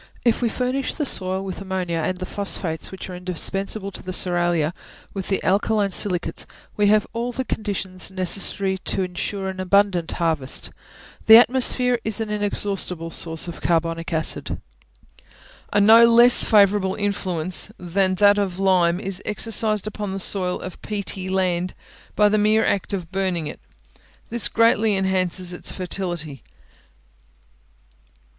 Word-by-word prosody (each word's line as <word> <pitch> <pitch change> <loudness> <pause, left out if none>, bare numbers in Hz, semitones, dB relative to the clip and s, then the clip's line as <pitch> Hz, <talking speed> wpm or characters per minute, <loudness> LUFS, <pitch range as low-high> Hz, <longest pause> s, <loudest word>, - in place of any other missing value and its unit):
If 235 0 +2
we 235 - +1
furnish 255 +3 -2
the 295 - -2
soil 190 -5 -2
with 190 0 -6
ammonia, 185 -3 -3
and 185 +3 -2
the 185 - -5
phosphates, 185 -5 -3
which 190 - -8
are 185 - -7
indispensable 195 +3 -3
to - - -9
the 185 - -6
cerealia, 175 -3 0 0.4
with 195 -2 -5
the 195 - -1
alkaline 200 +1 +1
silicates, 180 -2 -1 0.3
we 205 -1 +2
have 210 0 +3
all 235 +1 -3
the 260 +2 -4
conditions 195 -5 -3
necessary 190 +1 -1
to 190 - -1
ensure 190 +2 -4
an 190 0 -6
abundant 185 -2 +1
harvest. 160 -6 -2 0.6
The 220 0 +11
atmosphere 250 0 +3
is 220 0 -3
an 220 -1 -3
inexhaustible 200 -5 -1
store 165 0 -1
of 170 - -8
carbonic 165 0 -1
acid. 160 -1 -1 1.1
A 205 - +2
no 225 +3 +7
less 235 +1 +7
favourable 200 -3 +3
influence 185 -3 +1
than 185 +2 0
that 205 +1 +4
of 190 -3 -2
lime 180 -3 +2
is 195 -1 -3
exercised 215 -1 +1
upon 210 -2 -5
the 195 - -4
soil 185 -1 +1
of 185 - -8
peaty 200 -2 -3
land 185 -1 -1 0.4
by 210 - +4
the 210 +1 +2
mere 215 +1 +3
act 200 - -1
of 180 -4 -5
burning 185 -4 -1
it: - - -7 0.7
this 235 -2 +1
greatly 225 -2 +3
enhances 185 -1 0
its 175 - -2
fertility. 175 - -4
190 Hz, 145 wpm, -22 LUFS, 180-210 Hz, 1.1 s, The